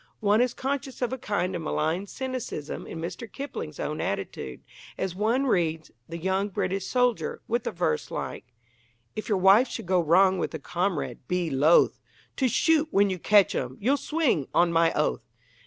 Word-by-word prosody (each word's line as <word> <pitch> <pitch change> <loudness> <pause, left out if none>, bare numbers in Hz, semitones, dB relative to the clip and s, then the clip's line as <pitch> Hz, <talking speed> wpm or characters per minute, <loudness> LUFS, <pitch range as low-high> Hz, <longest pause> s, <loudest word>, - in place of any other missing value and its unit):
One 210 +2 +3
is 250 -1 +1
conscious 265 -1 -3
of 245 - -1
a - - -2
kind 190 -6 -1
of 170 - -3
malign 160 +5 -1
cynicism 255 - -5
in - - -7
Mr. 180 +7 -6
Kipling's 270 - -6
own 150 - -3
attitude, 95 -10 -4 0.4
as 190 -2 -2
one 225 +8 +1
reads 165 - 0 0.2
The 170 - -5
Young 190 +4 0
British 190 0 -2
Soldier, 250 -2 0
with 235 0 -1
a - - 0
verse 165 - -1
like - - -5 0.7
If 215 - -5
your 205 - +2
wife 195 +7 +6
should - - -6
go 180 0 +2
wrong 185 +3 +4
with - - -2
a - - -4
comrade, 175 +3 -2
be 180 -3 -1
loth 145 +5 +4 0.4
To 265 - +2
shoot 315 +5 +3
when 200 -4 +3
you 185 - -3
catch 205 +2 +4
'em 125 0 -3
you'll 255 +7 +2
swing, 285 - 0
on 170 0 +4
my 165 0 +4
oath! - - -1
190 Hz, 180 wpm, -26 LUFS, 170-235 Hz, 0.7 s, wife